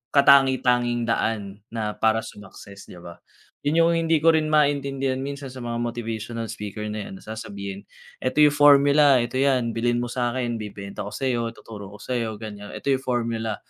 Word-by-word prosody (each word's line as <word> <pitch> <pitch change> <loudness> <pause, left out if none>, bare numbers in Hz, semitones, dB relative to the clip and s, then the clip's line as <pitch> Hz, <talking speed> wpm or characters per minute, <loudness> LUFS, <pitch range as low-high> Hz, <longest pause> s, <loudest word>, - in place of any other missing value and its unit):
katangi-tanging 130 -4 +4
daan 105 -3 -1
na 110 -2 -3
para 110 0 +2
sumakses 100 -2 -11
di 90 - -11
ba. 85 0 -10 0.5
Yun 150 +3 +2
yung 165 0 +5
hindi 165 -1 +2
ko 165 +1 +4
rin 155 -1 0
maintindihan 140 -3 +1
minsan 140 0 -6
sa 130 -1 -9
mga 120 0 -3
motivational 115 -1 -4
speaker 105 0 -6
na 105 -1 -5
yan, - - -9
na - - -17
sasabihin, 100 -3 -7 0.3
"Eto 145 +4 +2
yung 150 - +6
formula, 145 -2 +6
eto 125 +2 -3
yan. 130 -4 +2
Bilhin 120 +1 0
mo 120 - -5
sakin 120 -1 -2
bibenta 100 -1 -7
ko - - -7
sayo, 120 -3 -1
tuturo 105 -2 -10
ko - - -12
sa - - -8 0.2
ganyan, 105 -1 -9
eto 140 - -2
yung 135 - +2
formula" 115 -3 -2
120 Hz, 175 wpm, -24 LUFS, 110-135 Hz, 0.5 s, yung